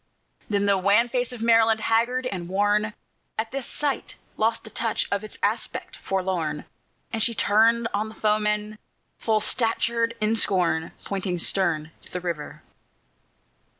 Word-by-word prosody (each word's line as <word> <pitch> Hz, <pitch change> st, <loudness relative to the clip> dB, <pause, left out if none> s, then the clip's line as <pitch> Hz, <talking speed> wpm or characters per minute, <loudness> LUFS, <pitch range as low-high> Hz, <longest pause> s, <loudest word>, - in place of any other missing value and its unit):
Then 200 Hz, -1 st, +1 dB
the 200 Hz, -1 st, +3 dB
wan 205 Hz, +5 st, +4 dB
face 245 Hz, 0 st, -1 dB
of 240 Hz, -2 st, -6 dB
Maryland, 225 Hz, -1 st, +4 dB
haggard 235 Hz, +3 st, +1 dB
and 180 Hz, -8 st, -4 dB
worn, 205 Hz, +2 st, +1 dB, 0.4 s
At 225 Hz, +1 st, -2 dB
this 270 Hz, -1 st, -4 dB
sight 290 Hz, -2 st, -2 dB, 0.2 s
lost 225 Hz, +1 st, +1 dB
the 220 Hz, -, -11 dB
touch 225 Hz, -2 st, 0 dB
of 200 Hz, +1 st, 0 dB
its 215 Hz, -, -8 dB
aspect -, -, -2 dB
forlorn, 180 Hz, -6 st, -2 dB, 0.5 s
And 225 Hz, -, -1 dB
she 230 Hz, +1 st, +2 dB
turned 225 Hz, +3 st, +4 dB
on 210 Hz, +2 st, -1 dB
the 220 Hz, -, -12 dB
foemen, 210 Hz, 0 st, 0 dB, 0.4 s
full 220 Hz, -1 st, +1 dB
statured 230 Hz, +1 st, +1 dB
in 215 Hz, +1 st, +2 dB
scorn, 175 Hz, -6 st, +1 dB
Pointing 190 Hz, -2 st, -2 dB
stern 160 Hz, -3 st, +1 dB
to -, -, -13 dB
the 180 Hz, -, -3 dB
river. 170 Hz, -4 st, -5 dB
215 Hz, 150 wpm, -25 LUFS, 195-230 Hz, 0.5 s, wan